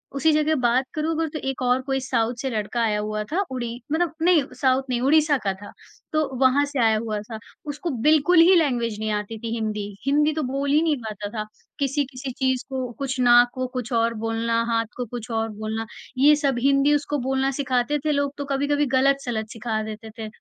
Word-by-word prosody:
उसी 315 Hz, +3 st, +3 dB
जगह 305 Hz, +1 st, +2 dB
बात 250 Hz, 0 st, +2 dB
करूँ 310 Hz, +1 st, -1 dB
अगर 325 Hz, 0 st, 0 dB
तो 310 Hz, -, -5 dB
एक 265 Hz, -, -5 dB
और 250 Hz, +1 st, +2 dB
कोई 270 Hz, 0 st, 0 dB
साउथ 240 Hz, -2 st, 0 dB
से 265 Hz, -, -2 dB
लड़का 225 Hz, +1 st, -2 dB
आया 210 Hz, -2 st, +1 dB
हुआ 215 Hz, 0 st, -2 dB
था 380 Hz, +4 st, +1 dB
उड़ी 240 Hz, -2 st, -3 dB, 0.2 s
मतलब 335 Hz, +1 st, +1 dB
अपने 330 Hz, +3 st, +2 dB
नहीं 295 Hz, -, +4 dB, 0.2 s
साउथ 260 Hz, 0 st, +3 dB
नहीं 240 Hz, -1 st, 0 dB
ओडिशा 295 Hz, +1 st, +4 dB
का 195 Hz, -, +1 dB
था, 205 Hz, +2 st, -11 dB, 0.4 s
तो 310 Hz, -2 st, +1 dB
वहाँ 265 Hz, +2 st, +5 dB
से 285 Hz, -2 st, -4 dB
आया 220 Hz, -1 st, +4 dB
हुआ 215 Hz, -1 st, -3 dB
था। 220 Hz, +1 st, -8 dB, 0.3 s
उसको 295 Hz, +4 st, -4 dB
बिल्कुल 315 Hz, +3 st, +5 dB
ही 365 Hz, +2 st, +7 dB
लैंग्वेज 240 Hz, -9 st, +1 dB
नहीं 215 Hz, 0 st, -2 dB
आती 210 Hz, +2 st, -3 dB
थी 230 Hz, 0 st, -4 dB
हिंदी। 215 Hz, -2 st, -2 dB, 0.2 s
हिंदी 300 Hz, +2 st, +3 dB
तो 310 Hz, -1 st, -2 dB
बोल 275 Hz, +2 st, -2 dB
ही 305 Hz, +2 st, +4 dB
नहीं 320 Hz, -3 st, +2 dB
पाता 210 Hz, -3 st, -6 dB
था। 215 Hz, -, -2 dB, 0.3 s
किसी-किसी 275 Hz, -1 st, -2 dB
चीज़ 260 Hz, -2 st, 0 dB
को 260 Hz, -2 st, -3 dB
कुछ 265 Hz, -1 st, -3 dB
नाक 245 Hz, 0 st, +6 dB
को 255 Hz, 0 st, -3 dB
कुछ 250 Hz, -1 st, -4 dB
और 230 Hz, 0 st, +2 dB
बोलना, 230 Hz, +1 st, 0 dB
हाथ 230 Hz, 0 st, +1 dB
को 250 Hz, -, -2 dB
कुछ 240 Hz, +1 st, -7 dB
और 225 Hz, 0 st, -1 dB
बोलना, 220 Hz, +1 st, -4 dB, 0.3 s
ये 295 Hz, +3 st, +6 dB
सब 280 Hz, -4 st, 0 dB
हिंदी 275 Hz, +2 st, +4 dB
उसको 295 Hz, 0 st, -1 dB
बोलना 265 Hz, 0 st, +1 dB
सिखाते 260 Hz, +1 st, 0 dB
थे 305 Hz, -, +2 dB
लोग 285 Hz, -1 st, 0 dB
तो 285 Hz, -, -4 dB
कभी-कभी 285 Hz, +1 st, +1 dB
गलत-सलत 260 Hz, -5 st, +1 dB
सिखा 220 Hz, -1 st, -3 dB
देते 220 Hz, +1 st, -7 dB
थे। 220 Hz, -, -4 dB
260 Hz, 215 wpm, -24 LUFS, 225-285 Hz, 0.4 s, ही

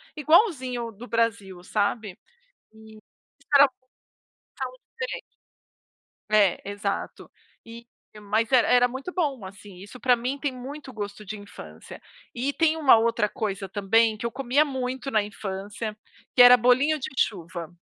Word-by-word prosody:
igualzinho 275 Hz, -, +2 dB
do 230 Hz, +4 st, -12 dB
Brasil, 200 Hz, -6 st, -1 dB
sabe. 205 Hz, 0 st, -2 dB, 0.6 s
E 220 Hz, 0 st, -15 dB, 0.5 s
espera 285 Hz, -1 st, +6 dB
passar 255 Hz, 0 st, -25 dB, 1.0 s
um -, -, -66 dB
tempo. -, -, -5 dB, 1.1 s
É. 205 Hz, -4 st, +3 dB
Exato. 205 Hz, +1 st, -4 dB, 0.4 s
E 235 Hz, +1 st, -12 dB, 0.3 s
mas 215 Hz, +4 st, -1 dB
era 250 Hz, -3 st, +5 dB
era 245 Hz, 0 st, +5 dB
muito 265 Hz, +8 st, -7 dB
bom, 280 Hz, -, -2 dB
assim. 195 Hz, 0 st, -12 dB
Isso 205 Hz, +7 st, -12 dB
pra 250 Hz, +1 st, +4 dB
mim 255 Hz, +4 st, -4 dB
tem 285 Hz, -1 st, -2 dB
muito 265 Hz, +2 st, -9 dB
gosto 205 Hz, -2 st, -7 dB
de 215 Hz, +2 st, -6 dB
infância. 80 Hz, -, -12 dB, 0.3 s
E 265 Hz, +4 st, -2 dB
tem 320 Hz, 0 st, +2 dB
uma 285 Hz, -7 st, +6 dB
outra 230 Hz, -2 st, +1 dB
coisa 195 Hz, -4 st, -4 dB
também 215 Hz, +2 st, +2 dB
que 235 Hz, -, -6 dB
eu 235 Hz, -, -2 dB
comia 275 Hz, +4 st, +1 dB
muito 260 Hz, -1 st, -4 dB
na 215 Hz, -, +3 dB
infância, 205 Hz, +1 st, -6 dB, 0.4 s
que 250 Hz, -, +7 dB
era 245 Hz, 0 st, +10 dB
bolinho 255 Hz, +6 st, +3 dB
de 255 Hz, -, -4 dB
chuva. 170 Hz, -3 st, -3 dB
230 Hz, 145 wpm, -25 LUFS, 205-260 Hz, 1.1 s, era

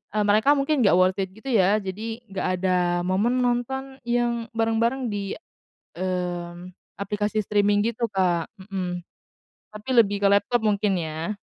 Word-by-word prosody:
eee, 210 Hz, -, +2 dB
mereka 215 Hz, +8 st, +4 dB
mungkin 280 Hz, +1 st, +1 dB
nggak 175 Hz, -, +5 dB
worth 185 Hz, +1 st, +3 dB
it 190 Hz, 0 st, -3 dB
gitu 255 Hz, +4 st, -6 dB
ya, 205 Hz, 0 st, +3 dB
jadi 220 Hz, +5 st, -5 dB
nggak 190 Hz, -, -2 dB, 0.2 s
ada 185 Hz, -1 st, +3 dB, 0.3 s
momen 220 Hz, +8 st, +1 dB
nonton 265 Hz, +2 st, -2 dB
yang 240 Hz, -1 st, 0 dB
bareng-bareng 230 Hz, +2 st, 0 dB
di, 200 Hz, -1 st, -3 dB, 0.6 s
mmm, 180 Hz, -1 st, -4 dB, 0.3 s
aplikasi 210 Hz, +2 st, -1 dB
streaming 205 Hz, 0 st, +2 dB
gitu, 230 Hz, 0 st, -2 dB
Kak, 180 Hz, -4 st, +1 dB
mhm. 185 Hz, -2 st, -4 dB, 0.7 s
Tapi 215 Hz, +4 st, -10 dB
lebih 205 Hz, -3 st, +4 dB
ke 200 Hz, -, +3 dB
laptop 205 Hz, +4 st, +2 dB
mungkin 205 Hz, -2 st, +1 dB
ya. 160 Hz, +6 st, -4 dB
205 Hz, 145 wpm, -24 LUFS, 185-235 Hz, 0.7 s, nggak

